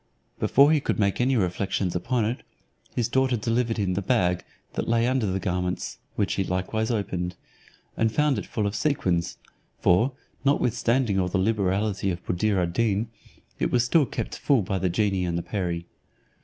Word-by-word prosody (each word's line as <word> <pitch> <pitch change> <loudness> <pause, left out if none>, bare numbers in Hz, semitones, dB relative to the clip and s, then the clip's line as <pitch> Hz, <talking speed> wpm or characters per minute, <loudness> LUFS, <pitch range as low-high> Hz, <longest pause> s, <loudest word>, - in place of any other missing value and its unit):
Before 140 +3 +5
he 155 - +4
could - - -1
make 100 +1 +1
any 130 +2 +2
reflections 95 -1 -1
upon 115 +5 0
it, 115 +4 -2 0.5
his 120 -3 +1
daughter 130 0 +2
delivered 115 +1 0
him 100 -3 0
the 100 - -1
bag, 90 -5 +1 0.3
that - - -3
lay 115 0 +2
under 125 -3 +1
the 95 0 -1
garments, 90 -1 -2 0.2
which 100 - 0
he 95 - 0
likewise 95 +5 -1
opened, 90 -5 -2 0.6
and 115 -1 +1
found 150 +2 +2
it - - -7
full 110 - -2
of 100 - -1
sequins: 90 - 0 0.4
for, 110 +10 +3 0.3
notwithstanding 125 -5 +2
all 90 - +1
the 90 - -1
liberality 100 0 +1
of 85 -1 -4
Buddir 100 +3 +1
ad 85 -1 0
Deen, 110 +1 0 0.5
it - - +1
was 120 -2 +3
still 140 +3 +3
kept - - -4
full 135 -7 +3
by 95 0 -2
the 95 0 +1
genie 95 0 +1
and 85 -1 -2
perie. 85 -4 -2
105 Hz, 175 wpm, -26 LUFS, 90-120 Hz, 0.6 s, Before